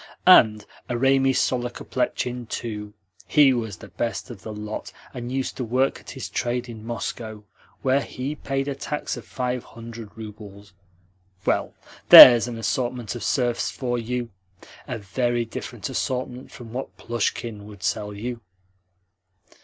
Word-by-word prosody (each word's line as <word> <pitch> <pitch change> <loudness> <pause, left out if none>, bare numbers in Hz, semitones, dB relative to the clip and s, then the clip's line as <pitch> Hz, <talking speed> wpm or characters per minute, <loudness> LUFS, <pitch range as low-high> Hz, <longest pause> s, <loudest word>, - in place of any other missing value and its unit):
And 110 - +7 0.2
Eremi 135 +2 +3
Sorokoplechin, 125 -1 -2
too! 105 -2 -5 0.3
He 145 -3 +5
was 110 -6 -3
the 100 - -12
best 115 +6 -3
of 105 -6 -10
the 110 - -7
lot, 105 0 -6 0.2
and 120 -1 -6
used 135 0 -2
to 130 - -2
work 130 +3 +1
at - - -14
his - - -6
trade 125 +1 -2
in 110 -2 -9
Moscow, 110 -2 -5 0.4
where 135 +1 +3
he 135 +2 -5
paid 135 -2 -3
a 140 - -1
tax 150 +2 -4
of - - -10
five 125 -1 -3
hundred 115 -1 -10
roubles. 105 -2 -10 0.7
Well, - - 0 0.3
THERE'S 120 -1 +12
an 120 -2 -5
assortment 120 -1 -2
of 120 - -6
serfs 120 -3 0
for 120 -2 -2
you! 120 +1 -3 0.6
a 125 -4 -3
very 120 +3 -1
different 115 - -6
assortment 125 0 -3
from 115 -3 -11
what 130 +2 -6
Plushkin 115 -2 -3
would 100 -3 -12
sell 105 0 -1
you!" 115 +3 -5
120 Hz, 145 wpm, -24 LUFS, 110-125 Hz, 0.7 s, THERE'S